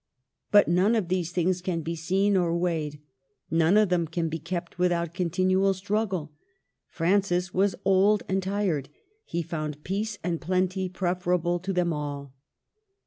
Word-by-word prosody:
But 205 0 +6
none 185 +7 +3
of 200 -6 -1
these 180 -2 -1
things 180 +1 0
can 175 -2 -2
be 165 +2 -3
seen 190 +5 +1
or 170 -2 +2
weighed; 160 -4 -2 0.5
none 165 +4 +4
of 215 -3 +4
them 175 -2 +1
can 165 +1 -2
be 165 +1 -4
kept 175 +2 -5
without 170 -2 +1
continual 185 +2 +1
struggle. 190 -5 -2 0.6
Francis 180 0 +1
was 195 +1 +2
old 195 +2 +4
and 190 +1 0
tired. 190 -7 -1 0.4
He 170 0 -2
found 150 -2 -5
peace 205 +3 -2
and 170 -1 -2
plenty 185 +2 0
preferable 180 -1 0
to 190 +3 -3
them 180 -2 +1
all. 145 -2 -5
180 Hz, 150 wpm, -27 LUFS, 165-190 Hz, 0.6 s, But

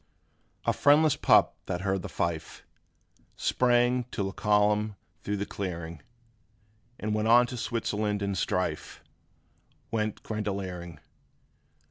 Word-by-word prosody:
A - - +3
FRIENDLESS 150 +1 +4
pup - - +5
that 90 - -2
heard 95 -1 0
the - - -6
fife 80 -2 -3 0.7
Sprang 125 0 +2
to 115 -4 -4
the 95 - -2
column 105 +1 +2 0.3
thro' 105 - -2
the 100 0 -2
clearing, 85 -6 -5 1.0
And 105 0 -1
on 115 +3 +5
to 125 - -6
Switzerland 105 -3 -2
and 100 0 -1
strife 90 +1 -2 0.9
Went 110 -2 -2
grenadiering. 95 -6 -4
105 Hz, 110 wpm, -28 LUFS, 95-115 Hz, 1.0 s, pup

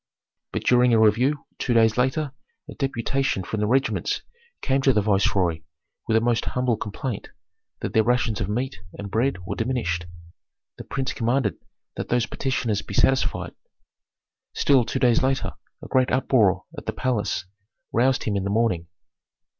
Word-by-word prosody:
But - - -3
during 125 -1 +4
a - - +4
review 125 +7 +3
two 120 - 0
days 110 -1 +5
later 135 +4 0 0.4
a - - -8
deputation 135 -4 -1
from 110 +4 -4
the 105 - +1
regiments 135 +4 0 0.4
came 135 0 +2
to 135 -1 +4
the 105 - +3
viceroy 95 -5 +2 0.5
with 110 -1 +3
a - - +3
most 120 -1 +1
humble 125 -2 0
complaint, 110 +2 -5 0.5
that - - -3
their 110 - +5
rations 115 -2 +1
of 100 - -2
meat 115 -1 -2 0.2
and 100 -1 -7
bread 110 -4 0
were - - -3
diminished. 110 -8 -1 0.7
The - - -7
prince 135 -1 -2
commanded 120 -3 0 0.4
that - - -4
those 120 -1 +2
petitioners 120 -6 -1
be 100 - -8
satisfied. 135 +5 +1 1.0
Still, 135 -4 +4
two 120 - -2
days 125 -3 +3
later 135 +1 0 0.3
a - - -7
great 130 -1 +2
uproar 120 -7 +3
at - - -9
the - - -1
palace 120 -7 -1 0.5
roused 130 +3 +2
him 105 - -1
in 100 - 0
the 100 - -2
morning. 100 -6 +1
120 Hz, 160 wpm, -24 LUFS, 105-130 Hz, 1.0 s, days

